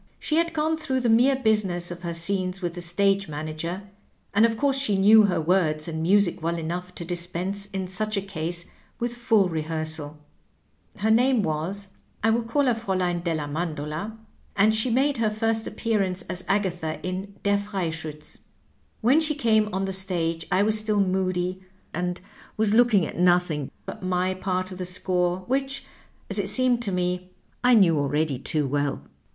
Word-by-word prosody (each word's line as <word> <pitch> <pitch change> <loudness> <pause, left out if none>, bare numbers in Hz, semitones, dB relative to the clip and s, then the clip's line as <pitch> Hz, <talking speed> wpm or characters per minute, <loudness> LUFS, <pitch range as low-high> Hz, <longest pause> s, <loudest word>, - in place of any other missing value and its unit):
She 310 - -1
had 335 0 +2
gone 315 +1 0
through 265 -5 -1
the 240 - +1
mere 250 +4 +5
business 210 -8 0
of 175 0 -7
her 170 -2 -3
scenes 185 +2 -1
with 175 -2 -3
the 175 - -6
stage 195 +3 +1
manager, 155 +5 -4 0.5
and 220 +3 +5
of 225 -1 -3
course 275 0 +2
she 210 -8 +2
knew 210 +2 +7
her 185 -4 +1
words 160 -2 +1
and 160 -1 -3
music 190 +1 +3
well 170 +1 -1
enough 175 +2 -5
to 170 - -6
dispense 180 +3 -3
in 190 -2 -4
such 215 +3 -1
a - - +1
case 170 -2 -4 0.3
with 240 0 -2
full 225 -5 +3
rehearsal. 155 -2 -4 0.8
Her 215 +2 +1
name 245 0 +4
was 180 +6 -2 0.2
— - - -34
^I 225 0 +4
will 235 - +1
call 255 +5 0
her 250 - +3
Fraulein 185 -6 -1
della 160 -4 -2
Mandola 155 +6 -4 0.2
— - - -30
^and 210 +2 +5
she 220 +3 +2
made 270 +4 +2
her 225 -2 +2
first 225 +1 +1
appearance 195 -5 -1
as 180 +1 -6
Agatha 180 -6 -1
in 190 +2 -4
^ - - -34
Der 200 0 +2
Freischiitz.' 165 -7 -5 0.3
" - - -39
When 255 +7 +5
she 310 -2 +1
came 220 -6 +2
on 195 0 -1
the 190 - -2
stage 170 -4 +1
I 185 +2 +4
was 215 +1 +2
still 215 -1 0
moody, 185 -1 0 0.3
and 180 0 -2 0.4
was 215 -1 +2
looking 220 -6 +5
at - - -6
nothing 175 -5 +2 0.2
but - - -7
my 185 0 0
part 185 0 -2
of 185 - -8
the - - -2
score, 180 0 0
which, 270 +3 -2 0.4
as - - -3
it - - -1
seemed 255 -2 +2
to 210 -4 -2
me, 180 0 -1 0.3
I 250 0 +6
knew 170 -8 +5
already 145 -1 0
too 150 +1 -1
well. 145 +1 -1
185 Hz, 185 wpm, -25 LUFS, 170-220 Hz, 0.8 s, knew